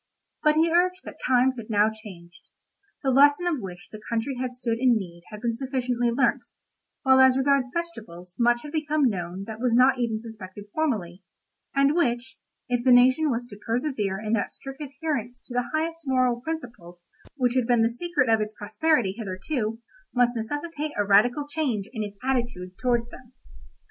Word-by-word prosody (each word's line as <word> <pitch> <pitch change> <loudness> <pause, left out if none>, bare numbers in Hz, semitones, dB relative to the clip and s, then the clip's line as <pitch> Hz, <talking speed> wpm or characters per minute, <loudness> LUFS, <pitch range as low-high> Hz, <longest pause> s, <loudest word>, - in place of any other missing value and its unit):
But 305 0 +4
he 325 +1 +3
urged 365 +1 +2
that - - -10
times 255 0 +3
had 230 -1 -8
now 210 0 +3
changed; 185 -6 -12 0.5
the 265 - +2
lesson 285 +5 +5
of 335 -5 0
which 180 -2 -8
the 215 - -9
country 230 +4 -1
had 250 -1 -4
stood 230 -2 -2
in 250 -2 +4
need 170 -4 -7
had 210 -1 -9
been 235 -1 -1
sufficiently 250 -2 -1
learnt, 250 +3 +1 0.6
while 265 -1 +5
as 260 0 +6
regards 270 -1 +2
vegetables 215 - -6
much 240 0 +3
had 295 - -8
become 305 -2 +1
known 185 -3 -3
that 220 0 -7
was 245 -1 +1
not 255 +1 +5
even 230 -3 -1
suspected 205 -3 -10
formerly, 205 - -1 0.5
and 275 +1 +4
which, 245 -7 0 0.3
if 245 -1 0
the 255 - +4
nation 255 +5 +5
was 240 -1 -1
to 205 - -10
persevere 225 -5 -1
in 215 +1 -3
that 225 - +1
strict 270 +2 -9
adherence 280 -4 -4
to 245 - -11
the 245 -1 -1
highest 325 0 -2
moral 255 -2 +2
principles 235 - -7 0.3
which 250 -4 +1
had 255 -3 +1
been 240 -2 +4
the - - +4
secret 295 +1 0
of 225 -1 +3
its 215 0 -3
prosperity 235 -1 +1
hitherto, 220 +3 -3 0.4
must 245 0 +3
necessitate 295 +6 -4
a 205 - +1
radical 240 +8 +3
change 270 -10 -2
in 220 - -3
its 205 -1 -6
attitude 235 -9 -2
towards 240 -2 +1
them. 255 0 -14
245 Hz, 180 wpm, -25 LUFS, 215-275 Hz, 0.6 s, as